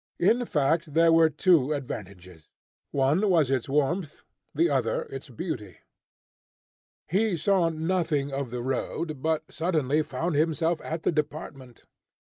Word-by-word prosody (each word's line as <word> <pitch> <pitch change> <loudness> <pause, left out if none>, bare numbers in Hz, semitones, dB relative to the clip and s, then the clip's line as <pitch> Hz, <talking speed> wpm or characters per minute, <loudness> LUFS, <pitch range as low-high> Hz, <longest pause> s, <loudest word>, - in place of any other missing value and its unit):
In 230 +7 +3
fact, 155 -1 0
there 165 0 +5
were 165 -1 +6
two 155 -2 +3
advantages, 90 - -8 0.4
one 145 +9 +2
was 160 -7 +3
its 130 -1 -1
warmth, 150 +4 -1 0.3
the - - +2
other - - 0
its 135 +1 -8
beauty. 115 - -6 1.3
He 195 +2 +1
saw 175 +1 +2
nothing 160 -4 -1
of 135 -2 -3
the 120 0 -4
road, 135 +3 -3
but 160 0 0
suddenly 155 -4 +1
found 155 +3 -3
himself 160 +2 +1
at 160 +1 -4
the - - +2
department. 145 -5 -5
155 Hz, 130 wpm, -27 LUFS, 135-170 Hz, 1.3 s, were